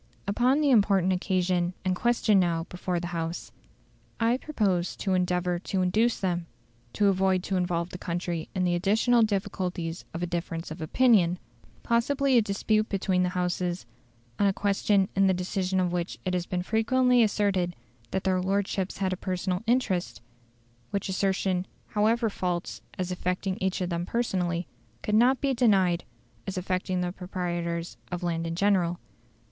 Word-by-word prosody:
"Upon 250 +8 +2
the 290 -2 +3
important 195 -5 +4
occasion 180 -1 0
and 185 0 +1
question 220 -1 +3
now 170 -2 +1
before 180 0 -2
the 175 0 -5
House, 165 0 -4 0.7
I 230 +2 +3
propose 200 - -1
to 190 - -1
endeavour 180 -1 +1
to 185 +1 -1
induce 220 +6 +2
them 175 -3 -1 0.5
to 205 - +1
avoid 190 -1 +2
to 195 - -2
involve 175 -1 -1
the 180 - -7
country 170 -2 -3
in 185 - +1
the 175 -1 +2
additional 220 +7 +3
difficulties 185 -5 -2
of 170 - -3
a - - +2
difference 170 -1 -4
of 160 +1 -7
opinion, 180 -1 +3 0.5
possibly 265 +3 +2
a 235 - +7
dispute 215 +1 0
between 190 -2 +1
the 180 - +2
Houses, 180 0 -1 0.5
on 205 - +4
a 195 - +2
question 200 0 +2
in 195 0 +4
the 190 - +3
decision 185 +1 -1
of 180 -1 +1
which 175 0 -2
it 185 - -1
has 180 -1 -1
been 180 -1 -2
frequently 250 +4 +3
asserted 200 -5 +1 0.3
that 190 - -2
their 185 -1 +1
lordships 195 0 -1
had 190 -1 0
a - - -4
personal 185 0 -2
interest; 220 -7 0 0.7
which 200 -1 -2
assertion, 190 -1 0 0.2
however 225 +3 +2
false 180 -4 -3 0.2
as 185 0 -2
affecting 180 +1 -2
each 190 0 0
of 180 - -1
them 170 +1 -2
personally, 180 -7 -1 0.4
could 210 - -2
not 245 +4 +5
be 275 -2 +1
denied 195 -8 +3 0.4
as 190 -1 -4
affecting 185 0 -1
the 180 0 -1
proprietors 175 -2 -4
of 175 0 -4
land 165 -1 -1
in 165 - -3
general. 180 -2 +2
185 Hz, 165 wpm, -27 LUFS, 175-205 Hz, 0.7 s, a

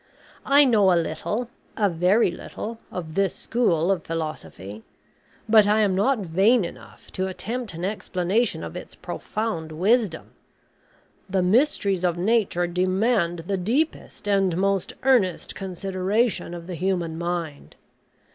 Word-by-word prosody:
I 285 +1 +6
know 210 -7 +4
a 175 - +4
little 205 +9 -3 0.3
a 210 - +3
very 180 +4 +3
little 225 +5 -7
of 165 -3 -6
this 195 0 +1
school 185 -7 +1
of 180 -4 -1
philosophy; 150 -11 -6 0.7
but 215 -2 +6
I 215 +1 +3
am 200 -3 +2
not 210 +2 +1
vain 195 +6 +3
enough 105 -10 -12
to 185 0 -2
attempt 220 +2 -4
an 170 +2 -4
explanation 200 +2 -1
of - - -7
its - - -8
profound 210 -8 -4
wisdom. 195 +2 +1 1.0
The 190 -1 +1
mysteries 200 - +2
of 175 -1 +1
Nature 190 -2 +1
demand 185 0 0
the 195 +1 -1
deepest 235 - -2
and 195 -4 +2
most 195 0 0
earnest 235 -10 +2
consideration 195 +2 -1
of 170 -1 -8
the 180 - -6
human 175 -2 -1
mind. 170 -3 -4
190 Hz, 135 wpm, -24 LUFS, 170-215 Hz, 1.0 s, I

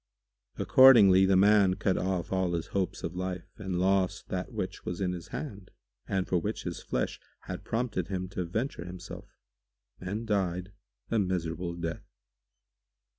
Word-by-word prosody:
Accordingly 100 -8 +7
the 95 - +4
man 100 -1 +5
cut 95 -1 0
off 90 -3 -2
all 95 -2 +1
his 85 0 -3
hopes 95 -3 -1
of 85 +2 -4
life 90 -1 -3
and 95 -5 -3
lost 95 0 +1
that - - -3
which - - -4
was 90 - -4
in 95 -2 0
his 90 -1 -6
hand 100 -3 -7 0.4
and 95 -1 -1
for 90 - +2
which - - -3
his - - -5
flesh - - -2 0.2
had - - -7
prompted 110 -6 -2
him 95 -1 -3
to 90 -1 -3
venture 110 +5 -3
himself, 90 0 -9 0.6
and 100 +5 -4
died 95 -3 -1 0.4
a 115 - +3
miserable 90 -2 -2
death. 85 -1 -5
95 Hz, 155 wpm, -29 LUFS, 90-100 Hz, 0.6 s, Accordingly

